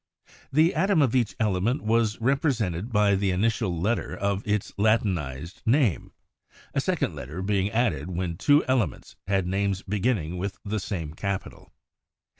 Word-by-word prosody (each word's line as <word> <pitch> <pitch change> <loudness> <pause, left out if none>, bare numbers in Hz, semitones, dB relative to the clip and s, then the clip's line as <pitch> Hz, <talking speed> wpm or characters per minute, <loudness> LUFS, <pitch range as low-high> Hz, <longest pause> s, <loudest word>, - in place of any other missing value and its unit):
The 160 +5 +4
atom 190 +2 +2
of 130 - +1
each 120 -4 +1
element 110 +4 +1
was 110 0 +1
represented 115 - 0
by 105 -2 +3
the 100 0 +1
initial 95 -2 0
letter 110 +7 -1
of 100 0 0
its 105 -1 -1
Latinized 90 - 0
name, 120 - +2 0.6
a - - +1
second - - 0
letter 80 +8 -6
being 100 0 +1
added 110 - 0
when 90 -1 -2
two 145 - +4
elements 120 - -1
had 95 -2 +1
names 95 +1 -1
beginning 100 -4 -1
with 100 +2 -3
the 105 +1 -1
same 85 -6 -4
capital. 100 +2 -5
100 Hz, 145 wpm, -26 LUFS, 95-115 Hz, 0.6 s, The